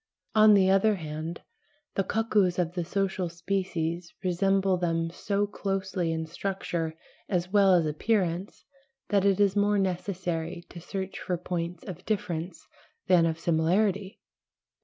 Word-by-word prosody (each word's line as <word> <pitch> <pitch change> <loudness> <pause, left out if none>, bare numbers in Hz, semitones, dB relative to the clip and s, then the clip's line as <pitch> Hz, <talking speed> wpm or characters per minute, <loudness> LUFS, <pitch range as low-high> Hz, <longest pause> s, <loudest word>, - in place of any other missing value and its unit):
On 215 -1 +7
the 190 -2 +5
other 195 +3 +4
hand, 160 0 -5 0.5
the 195 - +1
cuckoos 205 -3 +1
of 175 -1 0
the 175 -1 -2
social 190 0 -1
species 170 -1 -3
resemble 195 +1 +2
them 165 -2 -1
so 200 +3 -1
closely 195 -4 -2
in 160 0 -2
structure 170 -2 -3 0.3
as 180 -1 -1
well 200 -2 +6
as 170 -2 +3
appearance 180 +3 -1 0.4
that 200 -2 +3
it 195 -1 +3
is 200 -1 +3
more 205 0 +3
necessary 180 -3 -2
to 170 - -9
search 190 +2 -5
for 180 - -2
points 170 0 -4
of 180 -1 -8
difference 175 -5 -3 0.4
than 175 -3 +5
of 160 -1 -1
similarity. 190 +5 +1
185 Hz, 140 wpm, -28 LUFS, 170-195 Hz, 0.5 s, On